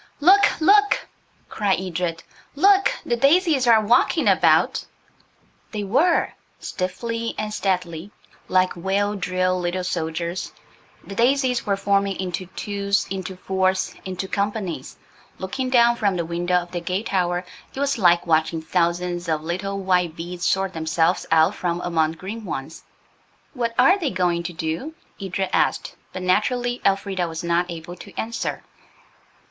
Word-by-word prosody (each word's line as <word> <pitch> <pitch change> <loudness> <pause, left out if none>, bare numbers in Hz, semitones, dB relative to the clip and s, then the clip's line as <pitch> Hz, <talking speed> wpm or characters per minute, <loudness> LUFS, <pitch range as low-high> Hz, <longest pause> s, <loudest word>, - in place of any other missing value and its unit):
"Look! 390 +7 +5
look!" 410 +5 +4 0.4
cried 200 -3 0
Edred; 175 -2 -3 0.3
"look! 390 +5 +4
the 240 - +1
daisies 280 +1 +3
are 230 -2 +7
walking 240 +5 +3
about!" - - +3 0.9
They 210 -1 -2
were. 290 - +2 0.3
Stiffly 230 +5 -3
and 210 0 -3
steadily, 180 -3 -2 0.4
like 185 0 +2
well 195 +3 0
drilled 185 -2 0
little 175 +1 -2
soldiers, 170 0 -3 0.5
the 200 - -8
daisies 250 +2 +1
were 200 -1 +1
forming 200 -1 +1
into 185 -1 -3
twos, 200 0 -1
into 190 -1 -4
fours, 190 0 0
into 185 0 -5
companies. 200 - -3 0.4
Looking 255 +8 -3
down 240 -2 +5
from 200 -4 +1
the 170 - -1
window 175 +2 -1
of 175 -1 0
the 175 -1 -3
gate 185 +5 -2
tower 180 -3 0 0.3
it - - -8
was 280 -3 0
like 175 -3 +4
watching 160 0 +1
thousands 175 +1 -1
of 155 -1 0
little 195 +4 -3
white 180 -4 +1
beads 175 +1 -4
sort 195 -1 0
themselves 160 +2 0
out 160 0 +4
from 175 -1 -2
among 160 -2 +1
green 200 +7 -7
ones. 155 -4 -6 0.7
"What 235 -4 -2
are 275 +11 +5
they 315 -7 0
going 180 -2 0
to - - -10
do?" 170 - -4 0.3
Edred 190 0 -2
asked, - - 0 0.2
but 185 - -6
naturally 245 +6 +1
Elfrida 195 -2 0
was 160 0 -6
not 170 +1 +1
able 170 +1 -7
to - - -11
answer. 230 +1 -3
185 Hz, 145 wpm, -23 LUFS, 175-220 Hz, 0.9 s, are